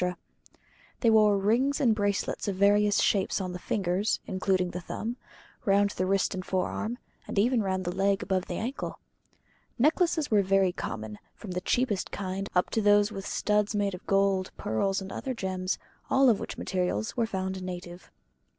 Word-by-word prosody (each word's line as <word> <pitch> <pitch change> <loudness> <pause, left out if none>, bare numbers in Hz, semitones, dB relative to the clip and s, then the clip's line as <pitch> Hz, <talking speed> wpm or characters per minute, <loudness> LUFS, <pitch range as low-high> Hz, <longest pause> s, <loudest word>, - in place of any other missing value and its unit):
They 230 - +4
wore 210 -2 +5
rings 235 +8 +2
and 245 -6 +4
bracelets 205 -1 -1
of 200 - -1
various 205 +1 +4
shapes 195 0 +1
on 185 -2 -3
the 180 - -5
fingers 190 +2 0
(including 185 -1 0
the 180 - -5
thumb), 230 +7 -5 0.5
round 200 -1 +3
the 185 -1 -2
wrist 195 +1 +1
and 185 -1 -4
forearm, 215 +5 -2 0.3
and - - -6
even 235 +3 +3
round 190 -2 -1
the 175 - -2
leg 195 +1 +1
above 190 -1 -1
the - - -4
ankle. 245 +5 -4 0.8
Necklaces 315 +2 +2
were 210 -2 +5
very 195 -1 +3
common, 110 -9 -6 0.2
from 205 - -9
the 180 0 -2
cheapest 220 -2 0
kind 195 0 -4
up 180 - +2
to 225 - +1
those 205 0 +4
with 195 -2 -6
the - - -4
studs 210 0 +1
made 200 -1 0
of 180 - -9
gold, 195 -1 +2
pearls, 195 - 0
and 190 - -8
other 260 -1 -4
gems, 185 -3 -2 0.3
all 265 -2 +5
of 210 - 0
which - - -6
materials 180 - -2
were 235 -2 +1
found 190 -2 -3
native. 180 -1 -7
195 Hz, 180 wpm, -28 LUFS, 185-215 Hz, 0.8 s, wore